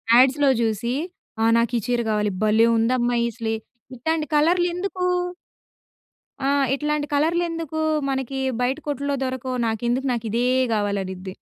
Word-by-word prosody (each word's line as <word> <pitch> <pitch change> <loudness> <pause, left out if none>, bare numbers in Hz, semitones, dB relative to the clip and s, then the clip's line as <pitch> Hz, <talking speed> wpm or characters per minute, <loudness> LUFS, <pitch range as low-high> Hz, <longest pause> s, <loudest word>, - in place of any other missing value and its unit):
యాడ్స్‌లో 270 +3 +5
జూసి, 230 +3 -1 0.5
ఆహ్, 225 0 +4
నాకీ 235 0 +1
చీర 240 -1 +1
కావాలి, 210 -2 0
భలే 220 +2 +4
ఉందమ్మా 240 +1 +1
ఈ - - -1
స్లే 225 -1 -1 0.4
ఇట్టాంటి 320 +5 -1
కలర్లెందుకూ 355 +3 +1 1.4
ఆ! - - +1 0.3
ఇట్లాంటి 295 +1 -1
కలర్లెందుకూ 330 0 0 0.3
మనకి 265 0 -2 0.2
బయట 260 +3 +1
కొట్టుల్లో 285 0 -1
దొరకవు? 255 -1 -3
నాకెందుకు 240 +4 -1
నాకు 235 -1 -3
ఇదే 240 +2 +1 0.3
గావాలనిద్ది. 195 -3 -2
255 Hz, 120 wpm, -23 LUFS, 230-295 Hz, 1.4 s, యాడ్స్‌లో